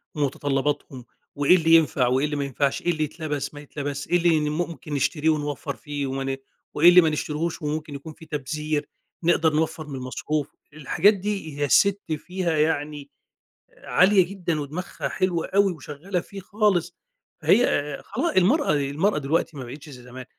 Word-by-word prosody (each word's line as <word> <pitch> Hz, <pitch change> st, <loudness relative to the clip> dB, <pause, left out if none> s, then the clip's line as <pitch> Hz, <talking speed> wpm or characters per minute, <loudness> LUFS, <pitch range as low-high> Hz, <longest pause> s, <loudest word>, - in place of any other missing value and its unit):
ومتطلباتهم 140 Hz, -2 st, -2 dB, 0.3 s
وإيه 145 Hz, +5 st, +5 dB
اللي 165 Hz, -2 st, +5 dB
ينفع، 145 Hz, -6 st, +3 dB
وإيه 130 Hz, +4 st, +2 dB
اللي 150 Hz, 0 st, -2 dB
ما 140 Hz, -, -1 dB
ينفعش، 140 Hz, 0 st, -1 dB
إيه 175 Hz, -, +1 dB
اللي 155 Hz, -2 st, -1 dB
يتلبس 150 Hz, -2 st, -4 dB
ما 145 Hz, -, -9 dB
يتلبسش، 145 Hz, -1 st, -5 dB
إيه 175 Hz, -, +3 dB
اللي 160 Hz, -3 st, +2 dB
ممكن 155 Hz, -2 st, -4 dB
نشتريه 150 Hz, +3 st, +1 dB
ونوّفر 145 Hz, -2 st, -2 dB
فيه، 145 Hz, -2 st, -4 dB
وما 135 Hz, 0 st, -3 dB
ن 135 Hz, 0 st, -2 dB, 0.4 s
وإيه 170 Hz, +4 st, +7 dB
اللي 180 Hz, 0 st, +8 dB
ما 160 Hz, -, +2 dB
نشتريهوش، 155 Hz, +2 st, -3 dB
وممكن 150 Hz, 0 st, -3 dB
يكُون 145 Hz, +3 st, -8 dB
في 160 Hz, -, -14 dB
تبذير، 150 Hz, 0 st, -3 dB, 0.4 s
نقدر 165 Hz, -2 st, +3 dB
نوَّفر 160 Hz, 0 st, -1 dB
من 140 Hz, -, -6 dB
المصروف، 135 Hz, +3 st, -3 dB, 0.3 s
الحاجات 155 Hz, +7 st, +3 dB
دي 195 Hz, -7 st, -4 dB
هي 145 Hz, -, +2 dB
السِت 200 Hz, +8 st, +4 dB, 0.2 s
فيها 175 Hz, 0 st, -2 dB
يعني 150 Hz, -2 st, -1 dB, 0.7 s
عالية 190 Hz, 0 st, +4 dB
جدًا، 175 Hz, -5 st, -2 dB
ودماغها 155 Hz, +6 st, -5 dB
حلوة 175 Hz, -3 st, -1 dB
أوي، 195 Hz, -1 st, +3 dB
وشغالة 160 Hz, +5 st, -4 dB
فيه 195 Hz, +3 st, -9 dB
خالص 190 Hz, -3 st, 0 dB, 0.5 s
هي، 245 Hz, -, +5 dB
آآ، 145 Hz, 0 st, -1 dB
خلاص 340 Hz, -, -1 dB
المَرأة 235 Hz, -, +4 dB
المَرأة 150 Hz, +8 st, +1 dB
دلوقتي 150 Hz, +2 st, -1 dB
ما 135 Hz, -, -5 dB
بقيتش 140 Hz, +5 st, -10 dB
زَي 125 Hz, -3 st, -11 dB
زمان، 125 Hz, +1 st, -10 dB
155 Hz, 170 wpm, -24 LUFS, 145-175 Hz, 0.7 s, اللي